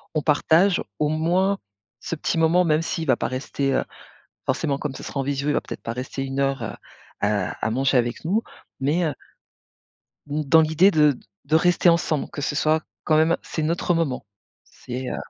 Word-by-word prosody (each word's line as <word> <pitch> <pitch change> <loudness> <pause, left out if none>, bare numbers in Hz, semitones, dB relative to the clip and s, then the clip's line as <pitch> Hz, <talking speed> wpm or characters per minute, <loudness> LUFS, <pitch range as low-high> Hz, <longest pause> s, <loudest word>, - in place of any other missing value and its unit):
on 155 - +2
partage 165 +5 +3 0.2
au 150 - +1
moins, 175 +6 +1 0.4
ce - - -3
petit 165 - -2
moment 165 +3 +4
même 155 -1 +2
s'il 165 0 -3
va 130 -3 +3
pas - - -1
rester, 135 +1 -2
heu, - - +1 0.6
forcément 140 +1 0
comme 145 -1 -4
ce - - -9
sera 140 - -5
en - - +1
visio, 140 +1 -2
il - - +2
va - - +1
peut-être - - -8
pas 115 - -4
rester 130 +2 -4
1 135 0 -4
heure 135 -1 0
à 115 - -6 0.4
à 105 +1 0
manger 135 +3 +2
avec 120 0 -1
nous. 195 +8 +1 0.4
Mais, 150 +6 +1
heu 155 - -1 1.1
dans 150 +2 +3
l'idée 160 +5 +4
de 150 -5 +4 0.3
de 155 +3 +1
rester 175 +2 +4
ensemble, 170 -3 +1
que - - -7
ce 145 - -2
soit 155 +1 +2 0.2
quand 155 - +3
même, 160 +2 +4
c'est 160 - -4
notre 170 +3 0
moment, 155 -9 -1 0.4
c'est 125 +1 -7
heu - - -3
150 Hz, 190 wpm, -23 LUFS, 135-165 Hz, 1.1 s, moment